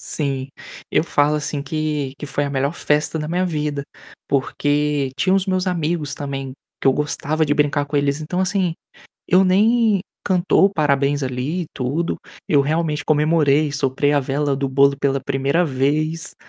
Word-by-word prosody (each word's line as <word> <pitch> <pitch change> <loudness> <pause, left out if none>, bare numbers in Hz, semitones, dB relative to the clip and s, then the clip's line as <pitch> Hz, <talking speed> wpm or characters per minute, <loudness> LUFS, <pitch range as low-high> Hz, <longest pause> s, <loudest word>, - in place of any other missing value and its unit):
Sim, 135 -3 -3 0.4
eu - - +3
falo 150 -2 +2
assim, 145 -1 -3
que 150 -2 -2
que 150 - -6
foi 145 0 -2
a - - -3
melhor 140 +2 -1
festa 150 0 0
da 150 - -4
minha 180 +3 0
vida, 150 -4 -2 0.4
porque 145 0 0
tinha 185 +7 +1
os 195 -1 +1
meus 185 -1 0
amigos, 160 -4 -1
também, 135 -2 -5 0.3
que - - +2
eu 135 - +5
gostava 150 +2 -1
de 145 - +2
brincar 145 0 +1
com 145 - -5
eles. 140 0 +1
Então, 160 +4 -3
assim, 185 -2 0 0.5
eu 185 +1 +5
nem 215 +2 +3 0.2
cantou 190 +1 +3
parabéns, 145 -4 +1
ali, 130 +7 -2
e - - -7
tudo, 140 +7 -1 0.3
eu 145 - +4
realmente 150 +1 -1
comemorei, 150 -1 +2
soprei 140 0 +1
a 145 - +3
vela 140 +1 -1
do 135 0 -2
bolo 140 +1 +4
pela 135 -1 0
1ª 140 +5 0
vez, 155 +3 -1
150 Hz, 165 wpm, -20 LUFS, 140-165 Hz, 0.5 s, eu